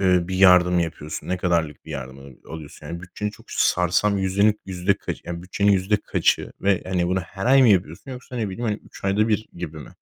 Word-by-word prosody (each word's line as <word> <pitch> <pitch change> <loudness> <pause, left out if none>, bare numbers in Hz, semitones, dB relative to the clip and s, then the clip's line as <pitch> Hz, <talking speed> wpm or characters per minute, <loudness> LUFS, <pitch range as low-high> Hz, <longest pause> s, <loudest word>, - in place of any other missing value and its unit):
eee, 90 -2 +4
bir 95 - -3
yardım 90 -2 +6
yapıyorsun, 80 -1 -5
ne 90 - 0
kadarlık 85 -5 -1
bir 80 - -11
yardım, 65 -2 -6
aaa, 70 +2 -14
alıyorsun? 75 -1 -9
Yani 85 +2 -6
bütçeni 105 +4 -5
çok - - -17
sarsan 90 +4 +2
yüzdelik 100 +2 +2
yüzde 95 +1 0
kaçı, - - -5
yani 85 0 -5
bütçenin 100 +2 +2
yüzde 100 +2 +2
kaçı - - 0
ve, 100 -2 +2
hani, 90 -2 0
bunu 95 0 +1
her 95 +5 -6
ay 135 +1 +6
mı 120 - +6
yapıyorsun 90 - +1
yoksa 125 0 -8
ne 110 -4 -1
bileyim, 105 +6 -5
hani, 105 - -3
3 - - -14
ayda 105 +3 +2
1 110 0 0
gibi 80 -3 -6
mi? 70 - -11
95 Hz, 220 wpm, -23 LUFS, 85-100 Hz, -, yardım